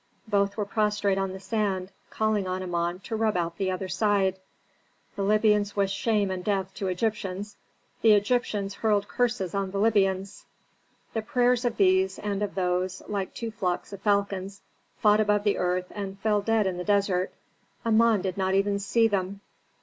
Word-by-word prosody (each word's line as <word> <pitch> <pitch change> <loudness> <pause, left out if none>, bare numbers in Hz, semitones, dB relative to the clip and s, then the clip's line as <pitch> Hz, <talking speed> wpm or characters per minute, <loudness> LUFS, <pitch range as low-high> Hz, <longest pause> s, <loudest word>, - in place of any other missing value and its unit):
Both 200 -1 +1
were 210 - 0
prostrate 210 -2 +1
on 195 -1 -1
the 190 - -7
sand, 195 -3 -2 0.2
calling 215 -3 0
on 185 0 -2
Amon 175 0 -2
to 225 - -5
rub 220 -3 +1
out 170 -1 -2
the 190 -1 0
other 185 +1 -3
side. 190 0 +1 0.8
The - - -3
Libyans 210 0 +2
wished 195 -1 +1
shame 210 -2 +1
and 185 -1 -4
death 190 -2 -1
to 195 - -4
Egyptians; 205 +1 -2 0.5
the 220 -2 +6
Egyptians 205 -2 +1
hurled 205 -1 +1
curses 240 -7 -1
on 195 -1 -1
the 200 - -4
Libyans. 195 -2 +1 0.7
The 225 - -1
prayers 245 +2 +2
of 235 -2 -1
these 190 -1 +3
and 205 -1 -3
of 205 -1 -2
those, 180 0 -1
like 200 -2 -3
two 230 -1 -4
flocks 185 -2 -3
of 195 - -8
falcons, 200 -1 -1 0.3
fought 210 0 +4
above 210 -1 +2
the 205 -1 +1
earth 180 0 -1
and 195 -2 -5
fell 210 +1 +1
dead 225 0 +2
in 185 -2 -1
the 180 - -3
desert. 195 -2 +1 0.5
Amon 225 -2 +4
did 185 -1 -3
not 190 0 +1
even 200 +1 +1
see 225 +3 +3
them. 200 -1 -2
200 Hz, 175 wpm, -27 LUFS, 190-210 Hz, 0.8 s, the